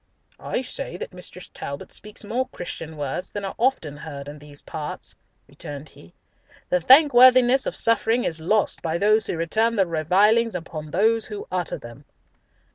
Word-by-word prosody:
"I 255 - -3
say 250 -7 -5
that - - -7
Mrs. 180 0 -8
Talbot 140 0 -7
speaks 210 +1 -5
more 245 +5 -2
Christian 160 -2 -7
words 145 +6 -4
than 205 -1 -4
are 195 - -4
often 220 - 0
heard 145 -2 -8
in 145 +1 -9
these 145 0 -11
parts," 150 -1 -6 0.3
returned 145 +1 -8
he. 85 - -17 0.5
"The 180 - +2
thankworthiness 255 - +6
of - - -3
suffering 230 +1 +3
is 160 -1 -2
lost 205 +5 +1
by 165 0 -1
those 215 +3 +3
who - - -2
return 220 +8 +1
the 195 -3 +3
revilings 195 +8 +2
upon 160 -3 -6
those 220 +7 +2
who 415 0 -7
utter - - -2
them." - - -12
190 Hz, 165 wpm, -23 LUFS, 160-230 Hz, 0.5 s, thankworthiness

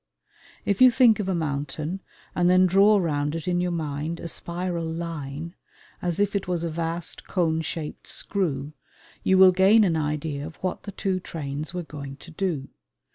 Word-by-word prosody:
If 200 +2 0
you 255 - +10
think 240 -3 +5
of 195 -2 -1
a 190 - +1
mountain 155 +3 -3 0.3
and 175 0 +3
then 185 +1 +6
draw 200 +3 +5
round 150 -4 0
it 165 0 -5
in 175 -1 +1
your 180 - 0
mind 160 0 -3
a - - -5
spiral 170 0 -3
line 165 -1 -5 0.5
as 175 -1 -1
if 205 0 +1
it 200 - -1
was 175 -2 -1
a 170 - -2
vast 165 +1 -4
cone 160 -4 +1
shaped 160 -1 -5
screw, 155 -8 -2 0.5
you 190 - +3
will 190 0 +9
gain 195 +4 +6
an 175 -5 +2
idea 150 -1 -2
of 160 - -11
what 185 +4 -3
the - - -5
two 190 -1 -1
trains 155 -1 -5
were 180 - -2
going 140 -3 -8
to 165 +5 -13
do. 160 -6 -2
170 Hz, 185 wpm, -25 LUFS, 150-185 Hz, 0.5 s, you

